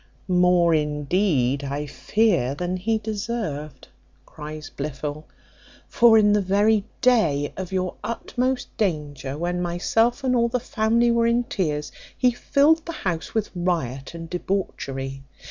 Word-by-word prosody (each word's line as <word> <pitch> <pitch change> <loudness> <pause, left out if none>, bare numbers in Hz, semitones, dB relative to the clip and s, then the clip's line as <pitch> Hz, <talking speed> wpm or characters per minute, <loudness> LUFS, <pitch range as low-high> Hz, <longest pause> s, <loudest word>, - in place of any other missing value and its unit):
"More, 180 -2 +4
indeed, 150 -2 +1
I 140 +2 -3
fear, 170 - +1
than 180 +3 -2
he 220 +5 0
deserved," 205 - -4 0.4
cries 150 0 -8
Blifil; 150 +1 -5 0.6
"for 235 -2 +5
in 210 -1 +5
the 210 - +3
very 200 +2 +2 0.2
day 165 - +2
of 190 -1 -6
your 185 -1 -1
utmost 250 +2 -2
danger, 145 -8 -2
when 175 +2 -2
myself 225 +9 +1
and 255 -1 +2
all 235 -1 +2
the 250 +1 0
family 235 0 +1
were 235 0 +3
in 235 +1 +2
tears, 150 -10 -2 0.3
he 250 -1 +3
filled 290 +6 +3
the - - -2
house 170 +1 -2
with 220 -2 -1
riot 165 -6 -2
and 165 0 -7
debauchery. 135 -7 -3
180 Hz, 135 wpm, -24 LUFS, 150-225 Hz, 0.6 s, for